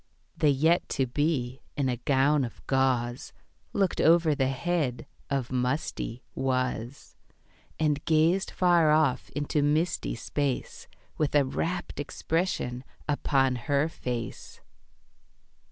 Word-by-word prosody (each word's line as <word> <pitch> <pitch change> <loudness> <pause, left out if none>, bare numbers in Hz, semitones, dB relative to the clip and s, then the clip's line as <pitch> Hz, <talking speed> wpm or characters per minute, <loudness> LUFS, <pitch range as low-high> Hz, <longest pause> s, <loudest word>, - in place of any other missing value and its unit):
The 150 - +3
Yet 160 +5 +2
to 135 - +3
be, 130 -1 -1 0.2
in 140 -2 +1
a 125 -1 -1
gown 140 +3 +2
of 115 - -7
gauze, 130 -2 0 0.4
Looked 195 -3 +1
over 165 -1 +5
the 135 -2 +1
head 145 -1 -1 0.2
of 135 -3 -1
musty 125 -1 -2
Was, 130 -1 -2 0.6
And 150 -2 +1
gazed 165 +4 +3
far 175 -3 +3
off 150 -4 +2
into 145 +1 0
misty 155 +3 0
space 140 +3 -3 0.3
With 150 -2 0
a 145 -2 +5
wrapt 165 +4 -3
expression 145 -4 -2 0.2
upon 135 -3 +2
her 145 +2 +2
face. 125 -7 -6
140 Hz, 115 wpm, -28 LUFS, 130-155 Hz, 0.6 s, over